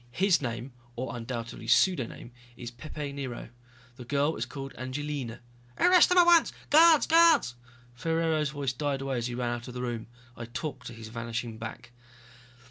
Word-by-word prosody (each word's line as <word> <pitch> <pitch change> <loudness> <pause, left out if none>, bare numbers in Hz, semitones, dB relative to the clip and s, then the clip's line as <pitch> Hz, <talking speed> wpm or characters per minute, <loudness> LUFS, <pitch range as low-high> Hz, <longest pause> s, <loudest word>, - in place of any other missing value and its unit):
His 185 +8 +2
name, 120 0 -5 0.2
or 125 +1 -4
undoubtedly 115 -1 -6
pseudoname, 130 -4 +1 0.3
is 120 -1 -7
Pepe 145 +3 -7
Nero. 135 -5 -6 0.5
The 125 - -8
girl 145 +5 0
is - - -3
called 135 -1 -7
Angelina...." 130 -2 -5 0.4
"Arrest 360 -1 +6
them 360 - +3
at 350 - +8
once! 340 -1 +5 0.2
Guards... 320 0 +7
guards 330 - +5 0.2
" 125 -1 -27
Ferraro's 160 +2 0
voice 140 -3 -3
died 140 +1 -2
away 135 -2 -2
as 120 - -2
he 120 - -5
ran 120 -1 -1
out 120 0 -6
of 125 - -9
the 125 - -4
room. 120 -2 -4 0.3
I 115 - -7
talked 130 +1 -6
to 120 - -8
his 110 -1 -10
vanishing 115 0 -5
back. 110 +1 -8
130 Hz, 175 wpm, -28 LUFS, 120-150 Hz, 0.5 s, at